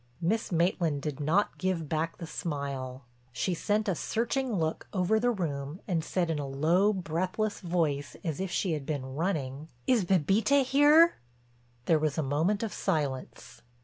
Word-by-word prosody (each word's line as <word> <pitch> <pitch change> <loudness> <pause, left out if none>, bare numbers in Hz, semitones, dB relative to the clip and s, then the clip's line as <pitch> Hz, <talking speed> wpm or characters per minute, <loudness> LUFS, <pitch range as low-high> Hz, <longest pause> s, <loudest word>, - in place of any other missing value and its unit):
Miss 200 +7 0
Maitland 170 -4 +1
did 150 -2 -3
not 160 +8 +1
give 185 -4 -1
back 160 +2 -2
the 170 - -6
smile; 140 -5 -4 0.3
she 180 +10 -1
sent 210 +5 0
a 195 - +2
searching 240 - -1
look 160 -3 -2
over 195 +3 +2
the 245 +2 +2
room 155 - -3
and 170 -5 0
said 170 0 0
in 155 - -1
a 140 - -3
low, 165 +9 +3
breathless 185 +3 -2
voice 160 -6 -1
as 160 -5 -3
if 190 0 -2
she 180 0 0
had 150 -3 -3
been 135 -4 -3
running: 150 -3 -2 0.2
"Is 245 -6 +3
Bébita 195 - +3
here?" 295 +6 +6 0.7
There 160 +2 +4
was 150 -2 -1
a 160 - +1
moment 160 +10 +1
of 220 - -3
silence. 140 -4 -3
170 Hz, 165 wpm, -29 LUFS, 150-200 Hz, 0.7 s, here